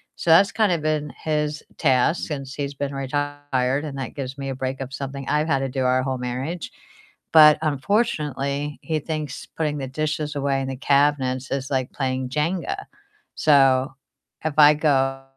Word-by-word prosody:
so - - -4
that's 180 +5 +6
kind 215 -4 +2
of 165 -3 0
been 155 -2 -1
his 150 -1 -1
task 135 +3 +2
since 135 -3 -5
he's 140 -1 -4
been 140 0 -3
retired, 140 -1 -1
and 140 -2 -6
that 135 - -5
gives 135 -1 -5
me 135 - -5
a - - -2
break 130 0 -3
of 135 0 -6
something 140 0 -6
I've 150 +1 +1
had 135 -4 +2
to 135 -1 -2
do 130 0 -2
our 130 0 +2
whole 130 -1 -2
marriage, 130 +7 -4 0.6
but 155 -1 +8
unfortunately, 145 - -1
he 155 -2 -1
thinks 155 -3 -5
putting 150 -2 -2
the 135 - -4
dishes 150 +1 -2
away 140 -1 0
in 135 - -3
the 135 - -4
cabinets 140 -2 +1
is 135 0 -2
like 130 -2 -1
playing 130 -2 -2
Jenga, 175 - -2 0.5
so 135 -2 +4 0.5
if 155 - 0
I 150 0 +8
go 135 -3 +1
140 Hz, 175 wpm, -23 LUFS, 135-150 Hz, 0.6 s, but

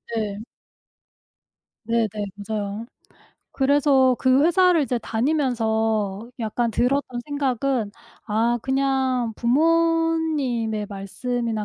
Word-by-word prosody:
네. 210 -3 -2 1.5
네네. 230 0 +1 0.3
맞아요. 205 +1 -4 0.7
그래서 270 -2 +3
그 260 +1 +3
회사를 350 -1 +4
이제 255 -3 -1
다니면서 225 -5 -1
약간 230 +1 -1
들었던 250 +1 0
생각은 270 -5 -1 0.4
아 230 +3 +1
그냥 265 -3 0
부모님의 310 -5 +1
말씀이나 220 +3 -3
245 Hz, 195 characters per minute, -23 LUFS, 220-280 Hz, 1.5 s, 회사를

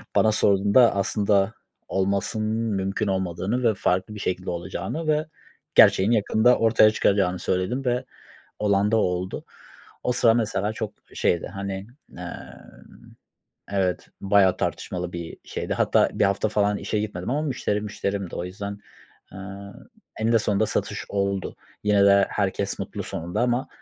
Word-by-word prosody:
bana 110 - +4
sorduğunda, 100 +3 +4
aslında 100 0 +1 0.3
olmasının 100 +3 -1 0.3
mümkün 95 +2 -1
olmadığını 95 +5 -1
ve - - +1
farklı 95 +2 -1
bir 105 - -7
şekilde 90 -1 -3
olacağını 95 - -4
ve 155 +1 +2 0.5
gerçeğin 95 +4 +6
yakında 115 +2 +3
ortaya 110 -1 +5
çıkacağını 95 -4 +1
söyledim 95 +9 -1
ve 125 0 0 0.5
olan 100 0 +2
da 115 - +4
oldu. 90 -2 -1 0.6
O 125 - +2
sıra, 120 -2 +4
mesela, 110 -2 0
çok 110 -2 -4 0.2
şeydi. 85 - 0
Hani, 100 0 -5 0.3
aaa, 90 0 -9 1.1
evet, 95 -2 -1
bayağı 95 -2 +4
tartışmalı 90 -1 -3
bir 85 -1 -6
şeydi. - - -4
Hatta - - +3
1 - - +2
hafta 100 +2 +1
falan 105 -1 +1
işe 100 +2 -2
gitmedim 105 -2 -4
ama 145 +4 0
müşteri 110 -7 -1
müşterimdi. 100 -2 -4
O 90 - -3
yüzden, 100 +2 -6 0.5
aaa, 100 +1 -9 0.5
eninde 115 +1 +3
sonunda 105 0 +1
satış - - -2
oldu. 100 -1 -2 0.3
Yine 105 -1 +4
de 100 0 +6
herkes 100 -2 -1
mutlu - - -5
sonunda 85 +6 -3
ama, 125 +2 +1
100 Hz, 140 wpm, -24 LUFS, 95-110 Hz, 1.1 s, gerçeğin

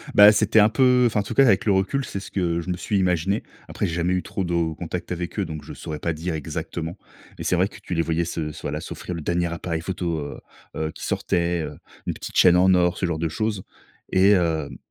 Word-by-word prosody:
Bah, 105 +1 +10
c'était 110 +1 +3
un 105 - +6
peu 125 0 +4
enfin 110 -3 +2
en 100 - 0
tout - - -5
cas, 135 - +6
avec 105 -4 +3
le 105 - +3
recul, 100 +9 +1
c'est 100 - -5
ce 95 - -10
que 85 -3 0
je 85 - -8
me 90 - -1
suis 100 - -1
imaginé. 95 +2 +1 0.2
Après, - - -2
j'ai 85 - -2
jamais 90 +1 +1
eu 90 - 0
trop 95 - -3
de 85 -2 0
contacts 85 +3 -5
avec 90 +3 -4
eux, 100 - +1
donc 80 -3 -7
je - - -9
saurais 75 -1 -6
pas 85 - -1
dire 85 +3 -4
exactement. 80 +2 -4 0.4
Mais - - -6
c'est - - +1
vrai 90 +3 +3
que - - -13
tu - - -6
les 85 - +2
voyais 85 +1 0
se 80 -2 -3
s 75 - -10
voilà, - - -3
s'offrir 90 - -6
le 80 - -5
dernier 85 +3 0
appareil 85 -1 -3
photo, 85 -2 -2
heu, 70 -1 -6 0.4
heu, 80 0 -2
qui - - -8
sortait, 85 0 0
heu, 75 - -7 0.3
une - - 0
petite - - -9
chaîne 90 -1 +7
en 95 +1 +5
or, 90 -1 +3
ce - - -1
genre 85 -3 -2
de 80 0 0
choses. 105 +2 -2 0.5
Et, 95 +2 +5
hem, 80 -6 +1
90 Hz, 260 wpm, -24 LUFS, 85-95 Hz, 0.5 s, Bah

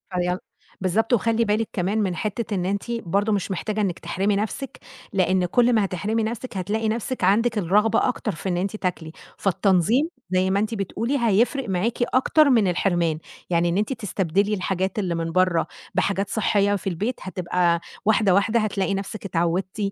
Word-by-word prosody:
فيال 180 0 0 0.4
بالضبط، 215 +6 +1
وخلّي 230 0 +2
بالِك 215 +1 0
كمان 195 +3 -1
من 190 -4 0
حتّة 215 +2 -3
إن 180 -2 -1
أنتِ 200 +5 -2
برضه 205 -1 0
مش 200 -1 -1
محتاجة 215 +3 -2
إنِّك 190 -4 -1
تحرمي 200 +2 0
نَفْسِك، 220 +6 -4 0.3
لإن 185 -1 +2
كل 240 +6 +3
ما 215 -3 +3
هتحرمي 210 +5 -1
نَفْسِك 230 0 -4
هتلاقي 215 +4 -1
نَفْسِك 230 0 -3
عندِك 220 +4 +3
الرغبة 210 +4 +3
أكتر 250 - -2
في 180 +4 -5
إن 175 - 0
أنتِ 195 +3 -2
تاكلي، 175 -5 -3 0.3
فالتنظيم 200 - +2 0.2
زي 185 +1 +2
ما 195 - +2
أنتِ 215 +2 -1
بتقولي 225 +6 -2
هيفرق 235 +3 +2
معاكِ 190 +5 0 0.2
أكتر 285 +3 +4
من 225 -6 +4
الحرمان، 175 -3 +1 0.3
يعني 170 0 +2
إن 170 - 0
أنتِ 215 +6 0
تستبدلي 200 -2 0
الحاجات 190 0 -1
اللي 180 -4 -1
من 165 0 -2
برّا 185 -1 +2 0.3
بحاجات 195 +1 0
صحيّة 205 -2 +2
في 195 - -5
البيت 205 +8 -1
هتبقى 175 -2 0 0.2
واحدة، 210 -3 +4
واحدة 215 +4 +3
هتلاقي 200 -2 0
نَفْسِك 195 +2 -5
اتعودتِ 175 +2 -1
200 Hz, 170 wpm, -23 LUFS, 180-220 Hz, 0.4 s, أكتر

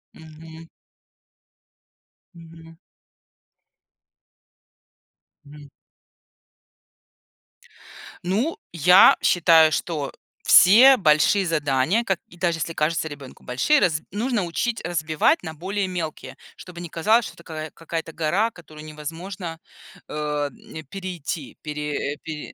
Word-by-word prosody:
Мгм. 160 +1 -13 1.7
Мгм. 165 0 -15 2.8
М. 145 -1 -13 2.5
Ну, 220 - -1
я 180 +3 +6
считаю, 165 -2 +5
что 155 -4 -3 0.3
все 245 +9 +7
большие 180 +3 +3
задания, 150 - 0
как 190 -6 -1
и 175 - -18
даже 170 -2 0
если 165 +1 -3
кажется 160 +2 -1
ребенку 145 -3 -11
большие, 130 - +2
раз 160 - +1
нужно 225 +1 -1
учить 225 +7 -3
разбивать 155 -3 +1
на 160 -2 -6
более 190 +4 -3
мелкие, 170 -4 -6 0.2
чтобы 175 -1 -11
не 175 - -7
казалось, 215 +9 +2
что - - -9
такая 155 -2 -8
какая-то 165 0 -6
гора, 185 +9 0
которую 155 -4 -13
невозможно, 165 +3 -7 0.5
э, - - -10
м, 150 +1 -5
перейти, 170 -3 -6
пере 150 -1 -4
пере 155 -2 -7
165 Hz, 100 wpm, -23 LUFS, 155-185 Hz, 2.8 s, все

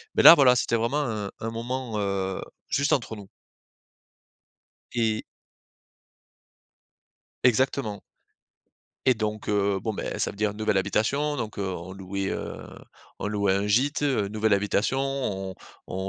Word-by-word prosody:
mais - - +4
là 165 - +12
voilà 130 -5 +6
c'était 115 - +1
vraiment 120 +6 +1
un 110 -7 -3
un 115 0 -3
moment, 120 0 -4
heu, 95 -1 -1 0.3
juste 140 +2 +2
entre 115 -4 -1
nous. 100 -2 -11 1.7
Et 110 -2 0 2.2
Exactement. 125 -3 +2 1.0
Et 130 -2 +5
donc, 105 -1 -3
heu, 100 -1 +1
bon, 110 +2 -3
beh, - - -4
ça - - 0
veut - - -9
dire 105 -1 0
nouvelle 110 -1 0
habitation 140 +10 +1
donc, 110 -6 -5
heu, 100 - -1
on 90 -1 -5
louait, 95 0 -4
heu, - - -4 0.6
on - - -2
louait 100 -2 +1
un 100 +1 0
gîte, 135 +8 +2
heu, 130 -9 +1
nouvelle 110 +1 +1
habitation 105 +6 +1
on 105 -9 -2 0.3
on - - -6
110 Hz, 140 wpm, -26 LUFS, 100-125 Hz, 2.2 s, là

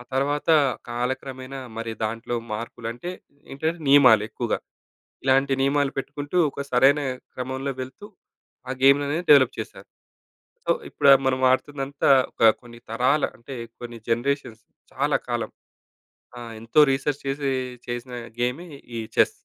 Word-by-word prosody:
తర్వాత 145 +3 0 0.4
కాలక్రమేణా 130 +2 -4 0.2
మరి 115 0 -4
దాంట్లో 115 +2 -3 0.2
మార్పులు 115 +1 -6
అంటే, 125 +9 -7 0.4
ఏంటంటే, 160 +5 -2
నియమాలు 130 -6 +7
ఎక్కువగా. - - -2 0.7
ఇలాంటి 135 +1 +3
నియమాలు 140 0 +2
పెట్టుకుంటూ 145 +4 -5
ఒక 140 - -5
సరైన 135 +4 +5 0.3
క్రమంలో 130 +2 -3
వెళుతూ, 130 +11 -8 0.6
ఆ - - -1
గేమ్ 140 +1 +7
అనేది 160 +5 -2
డెవలప్ 140 -4 +7
చేశారు. - - -8 0.8
సో, - - +2 0.2
ఇప్పుడు 140 - +3 0.2
మనం 130 0 +1
ఆడుతుందంతా 140 +1 -1 0.2
ఒక - - -3 0.2
కొన్ని 120 -1 -13
తరాల 130 +6 +2
అంటే, 125 +3 -9 0.3
కొన్ని 120 -1 -8
జనరేషన్స్ 120 -2 -1 0.3
చాలా - - +1
కాలం - - -2 0.9
ఆ! - - -7 0.2
ఎంతో 115 +7 +1
రిసెర్చ్ 135 +1 -1
చేసి, 140 0 -1 0.4
చేసిన 120 +1 -5 0.3
గేమే 125 +9 -2 0.3
ఈ - - -2 0.2
చెస్. - - +5
135 Hz, 125 wpm, -24 LUFS, 120-140 Hz, 0.9 s, నియమాలు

